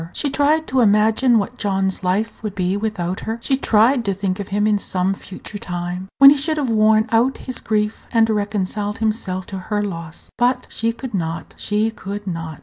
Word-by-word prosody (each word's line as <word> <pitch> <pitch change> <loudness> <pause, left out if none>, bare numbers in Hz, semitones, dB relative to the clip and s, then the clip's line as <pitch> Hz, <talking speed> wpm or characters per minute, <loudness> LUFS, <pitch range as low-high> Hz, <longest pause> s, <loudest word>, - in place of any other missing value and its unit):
She 285 - -1
tried 300 +3 +2
to 260 -3 0
imagine 220 +3 +4
what 220 +4 -2
John's 195 -2 0
life 200 +5 -1
would 210 -3 -5
be 185 0 0
without 200 -4 -2
her. 225 +1 -4
She 270 +3 0
tried 240 0 +3
to 195 -1 0
think 190 -1 -2
of 200 - -4
him 205 +1 0
in 210 -1 +2
some 185 0 0
future 195 +1 -9
time, 180 +1 -5
when 275 -1 +10
he 290 - +3
should 310 +3 0
have 275 -5 0
worn 215 0 +4
out 235 +4 +2
his 255 -2 -4
grief, 210 0 -2
and 225 -2 +4
reconciled 210 -1 -2
himself 210 -4 -2
to 190 - -3
her 205 +2 -2
loss. 170 -4 -7
But 250 +1 +2
she 230 +1 0
could 240 +1 -8
not, 165 -3 -3
she 210 +2 0
could 205 -1 -7
not! 165 -4 -5
210 Hz, 200 wpm, -20 LUFS, 190-230 Hz, -, when